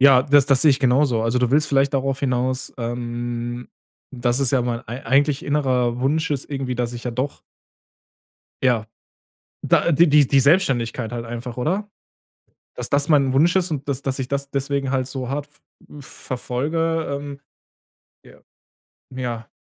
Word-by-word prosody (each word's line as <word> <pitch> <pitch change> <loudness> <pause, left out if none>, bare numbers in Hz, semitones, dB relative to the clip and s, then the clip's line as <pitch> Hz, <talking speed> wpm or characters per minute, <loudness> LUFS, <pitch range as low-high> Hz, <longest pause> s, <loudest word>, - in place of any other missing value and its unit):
Ja, 135 -2 +7
das 140 0 +4
das 135 -2 +3
sehe 155 - +6
ich 135 - +2
genauso. 130 -3 +2
Also, 115 +2 +1
du 125 -1 +1
willst 150 +3 +3
vielleicht 140 0 +2
darauf 135 0 -1
hinaus, 130 -1 -1
ähm, 120 0 -4 0.4
dass 120 -1 0
es 135 -3 +1
ja 130 -2 +3
mein 120 -1 -2
ei 120 +5 -7
eigentlich 140 +3 +2
innerer 130 -5 0
Wunsch 155 +5 0
ist 140 -2 -2
irgendwie, 135 -3 -3
dass 120 0 -2
ich 120 - -8
ja 125 - -2
doch 130 +4 -3 1.2
ja. 120 -4 +2 0.8
Da, - - +3
äh, 170 - +3
die 150 -2 +5
die 135 +1 +4
Selbstständigkeit 130 -6 +1
halt 120 -1 -4
einfach, 120 +1 -6
oder? 190 +11 -2 0.9
Dass 125 - -5
das 140 +1 +1
mein 140 -3 +4
Wunsch 165 +7 +3
ist 185 -2 +1
und 145 -3 -4
dass 140 -1 -2
dass 135 -1 -3
ich 130 - -2
das 140 0 -3
deswegen 140 -1 -1
halt 130 -2 0
so 130 -2 -5
hart 145 +1 -3
v - - -36 0.5
äh, - - -9
verfolge, 155 +6 -3
ähm, 140 0 -5 0.9
ja. - - -17 0.8
Ja. 120 -3 -4
135 Hz, 170 wpm, -22 LUFS, 125-145 Hz, 1.2 s, Ja